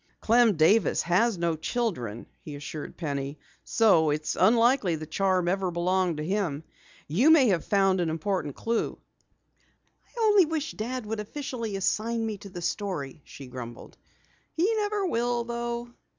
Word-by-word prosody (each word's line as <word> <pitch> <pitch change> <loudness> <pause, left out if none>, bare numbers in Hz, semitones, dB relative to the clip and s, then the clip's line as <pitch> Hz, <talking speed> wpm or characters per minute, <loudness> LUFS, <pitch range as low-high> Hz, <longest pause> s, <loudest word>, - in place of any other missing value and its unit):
"Clem 230 -2 +4
Davis 170 +7 +3
has 200 +5 +2
no 170 -1 0
children," 155 - -3 0.2
he 150 - -8
assured 145 +1 -7
Penny, 140 -3 -4 0.3
"so 195 -9 +4
it's 150 +1 -1
unlikely 230 -2 +3
the 155 0 -6
charm 185 +2 0
ever 190 +1 0
belonged 175 0 0
to 150 - -3
him. 175 -6 -1 0.4
You 215 - +3
may 295 -7 +6
have 180 -5 +1
found 195 -2 +2
an 170 - 0
important 160 -2 -2
clue." 230 0 -2 1.1
"I 475 - -12
only 415 -4 +6
wish 315 -1 -3
Dad 245 +2 -4
would 220 +1 -4
officially 230 -2 -5
assign 225 +4 0
me 215 -2 -4
to 200 - -10
the 175 -2 -8
story," 165 -9 -3
she 140 - -11
grumbled. 125 -2 -9 0.6
"He 370 +8 +1
never 415 -1 0
will, 240 -6 0
though." 235 0 -4
195 Hz, 150 wpm, -27 LUFS, 160-235 Hz, 1.1 s, may